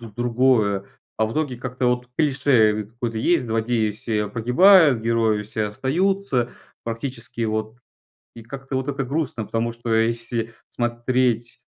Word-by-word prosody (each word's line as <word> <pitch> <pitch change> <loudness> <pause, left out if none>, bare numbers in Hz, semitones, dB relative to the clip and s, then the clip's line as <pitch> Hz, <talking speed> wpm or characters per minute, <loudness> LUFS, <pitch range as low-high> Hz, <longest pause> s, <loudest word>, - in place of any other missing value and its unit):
д 115 -3 -10
другое. 120 -5 +2 0.3
А 110 - +1
в 110 - -5
итоге 145 -5 -2
как-то 125 0 -3
вот 125 0 0
клише 125 -8 +3
какое-то 115 0 -5
есть: 170 +2 +2
злодеи 115 0 0
все 105 0 -2
погибают, 130 - +5
герои 115 -2 +1
все 110 +1 -3
остаются 135 - 0 0.3
практически, 115 0 -5
вот. 110 +1 -2 0.6
И 115 - -10
как-то 135 +3 -7
вот 130 +1 -2
это 140 -1 -2
грустно, 130 -5 -2
потому 115 +2 -1
что 115 -1 -3
если 115 0 -1 0.2
смотреть 120 0 -1
120 Hz, 140 wpm, -22 LUFS, 110-130 Hz, 0.6 s, погибают